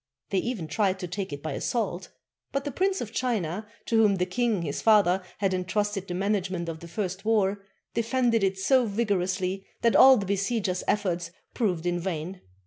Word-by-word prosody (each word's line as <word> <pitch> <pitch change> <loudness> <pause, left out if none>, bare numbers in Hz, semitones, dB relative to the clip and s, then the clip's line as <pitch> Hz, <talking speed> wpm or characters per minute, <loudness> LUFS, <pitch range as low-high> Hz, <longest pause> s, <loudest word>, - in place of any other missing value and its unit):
They 195 - +2
even 210 -7 -3
tried 190 +4 +1
to 180 - -3
take 185 +1 -4
it 145 0 -6
by 155 -2 -3
assault; 190 - -2 0.4
but 275 0 -1
the 290 - -2
Prince 380 +6 0
of 220 - -5
China, 210 -6 -1 0.2
to 230 - +1
whom 205 -2 +4
the 180 -1 0
king 210 0 0
his 145 -3 -3
father 200 -4 +4 0.2
had 195 -2 0
entrusted 195 +2 -1
the 175 - -4
management 190 -3 -1
of 165 -1 -5
the 170 - -10
first 190 +1 -4
war, 205 -3 +1 0.3
defended 230 -1 +1
it 190 0 +1
so 250 +5 +3
vigorously 195 -3 -1 0.2
that 230 - +4
all 265 -1 +9
the 200 - -2
besiegers' 195 -1 -1
efforts 180 -5 0 0.2
proved 180 -8 -1
in 175 0 0
vain. 180 +1 -4
195 Hz, 185 wpm, -27 LUFS, 180-220 Hz, 0.4 s, all